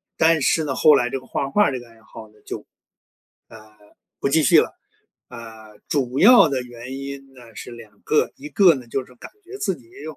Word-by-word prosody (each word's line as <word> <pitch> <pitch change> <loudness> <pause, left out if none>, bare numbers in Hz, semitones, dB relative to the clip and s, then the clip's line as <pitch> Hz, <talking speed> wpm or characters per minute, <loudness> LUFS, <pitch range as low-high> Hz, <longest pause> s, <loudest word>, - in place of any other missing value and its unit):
但 160 -1 +3
是 160 - +2
呢， 145 -3 -3
后 155 - +5
来 125 -3 +1
这 135 - -3
个 130 - -18
画 135 - -3
画 205 +5 +3
儿 - - 0
这 130 - -4
个 120 - -14
爱 115 -1 -21
好 110 0 -12
呢 - - -26
就， - - -7 0.8
呃， 115 - -13 0.6
不 - - 0
继 155 +2 +2
续 - - +6
了。 - - -4 0.5
啊， 110 -3 -12
主 130 -3 -1
要 240 -5 +7
的 135 -3 -2
原 120 +1 -10
因 135 0 -9
呢 120 -3 -16
是 - - -9
两 110 -4 -14
个： 155 - 0
一 145 - -10
个 175 +3 +5
呢， 130 -3 -9
就 130 +2 -3
是 125 - -20
感 - - -12
觉 395 +3 -10
自 190 - -2
己 125 -5 -20 0.2
有 155 0 -8
135 Hz, 240 characters per minute, -21 LUFS, 120-150 Hz, 0.8 s, 要